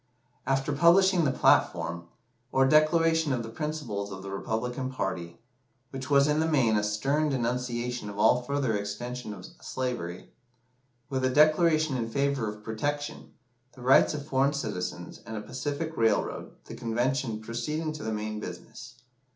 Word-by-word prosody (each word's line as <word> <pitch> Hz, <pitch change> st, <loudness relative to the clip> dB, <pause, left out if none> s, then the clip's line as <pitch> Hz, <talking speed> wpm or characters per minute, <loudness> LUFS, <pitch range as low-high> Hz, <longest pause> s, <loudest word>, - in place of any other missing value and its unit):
After 135 Hz, +2 st, +1 dB
publishing 175 Hz, +3 st, +5 dB
the 135 Hz, -, +2 dB
"platform," 85 Hz, -8 st, +2 dB, 0.4 s
or 135 Hz, 0 st, +4 dB
declaration 160 Hz, +1 st, +4 dB
of 125 Hz, -3 st, -1 dB
the 115 Hz, -, -7 dB
principles 115 Hz, -7 st, -4 dB
of 95 Hz, 0 st, -7 dB
the 100 Hz, -, -6 dB
Republican 125 Hz, +6 st, -3 dB
party 90 Hz, -8 st, -4 dB, 0.5 s
which 130 Hz, -1 st, -6 dB
was 140 Hz, 0 st, +5 dB
in 150 Hz, +1 st, +2 dB
the 160 Hz, -, +2 dB
main 130 Hz, -8 st, +3 dB
a 105 Hz, -, +1 dB
stern 135 Hz, +9 st, +1 dB
denunciation 125 Hz, -2 st, -2 dB
of 100 Hz, -, -8 dB
all 125 Hz, +4 st, +4 dB
further 130 Hz, -3 st, -1 dB
extension 115 Hz, +4 st, -4 dB
of 105 Hz, -, -9 dB, 0.2 s
slavery 120 Hz, -9 st, -4 dB, 0.8 s
with 130 Hz, -1 st, -1 dB
a 130 Hz, -, +3 dB
declaration 155 Hz, +1 st, +4 dB
in 115 Hz, -2 st, -2 dB
favour 140 Hz, -2 st, 0 dB
of 105 Hz, 0 st, -9 dB
protection, 145 Hz, +7 st, -4 dB, 0.4 s
the 125 Hz, -, -14 dB
rights 135 Hz, +4 st, +5 dB
of 145 Hz, -1 st, -5 dB
foreign 140 Hz, 0 st, +2 dB
citizens, 90 Hz, -, -4 dB
and 110 Hz, -1 st, -6 dB
a -, -, -4 dB
Pacific 145 Hz, +7 st, -4 dB
railroad, 115 Hz, -2 st, +1 dB, 0.2 s
the -, -, -9 dB
Convention 120 Hz, 0 st, -1 dB
proceeded 150 Hz, +8 st, -3 dB
to 155 Hz, -, -8 dB
the 110 Hz, -, -3 dB
main 110 Hz, 0 st, -3 dB
business. -, -, -9 dB
125 Hz, 155 wpm, -28 LUFS, 110-145 Hz, 0.8 s, publishing